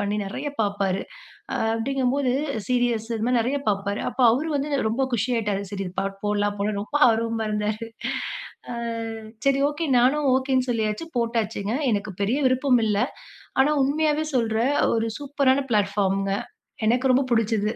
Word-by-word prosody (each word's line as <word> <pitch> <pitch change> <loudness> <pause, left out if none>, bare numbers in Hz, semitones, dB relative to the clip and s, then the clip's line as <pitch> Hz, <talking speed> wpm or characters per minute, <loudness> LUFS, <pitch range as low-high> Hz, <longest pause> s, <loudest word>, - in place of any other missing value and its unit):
பண்ணி 205 +1 -1
நெறைய 270 +9 -4
பாப்பாரு. 200 -2 0 0.7
அப்டிங்கும்போது 260 +3 0 0.4
சீரியல்ஸ் 240 -3 +1
இது 220 - -3
மாரி 250 -1 +3
நெறைய 255 +5 0
பாப்பாரு. 200 0 -1
அப்போ 260 - -1
அவரு 295 +7 -1
வந்து 280 +2 -2 0.2
ரொம்ப 230 +5 0
குஷி 225 +3 0
ஆயிட்டார் 210 -3 -1
சரி 195 -1 -3
இந் 180 - -14
பாட்டு 195 0 -3
போடலாம் 205 0 0
போல 210 +1 0
ரொம்ப 210 - -12
ஆர்வமா 225 0 0
இருந்தாரு. 210 +2 -2 0.8
ஆ. - - -4 0.7
சரி, 275 0 +3
ஓகே 315 +3 -3
நானும் 275 +4 +3
ஓகேன்னு 260 -1 +1
சொல்லியாச்சு 220 +5 -1
போட்டாச்சுங்க. 225 -3 -1 0.2
எனக்கு 205 -1 -1
பெரிய 225 +8 +1
விருப்பம் 255 -1 +3
இல்ல 210 -1 +1 0.6
ஆனா 285 +3 +3
உண்மையாவே 305 +2 +1
சொல்றேன் 230 +3 +1 0.2
ஒரு 225 0 0
சூப்பரான 280 -1 +2
பிளாட்பார்ம்ங்க 200 -2 +1 0.5
எனக்கு 255 +3 +2
ரொம்ப 270 +2 +4
புடிச்சது. 220 -2 +1
230 Hz, 145 wpm, -24 LUFS, 205-265 Hz, 0.8 s, ரொம்ப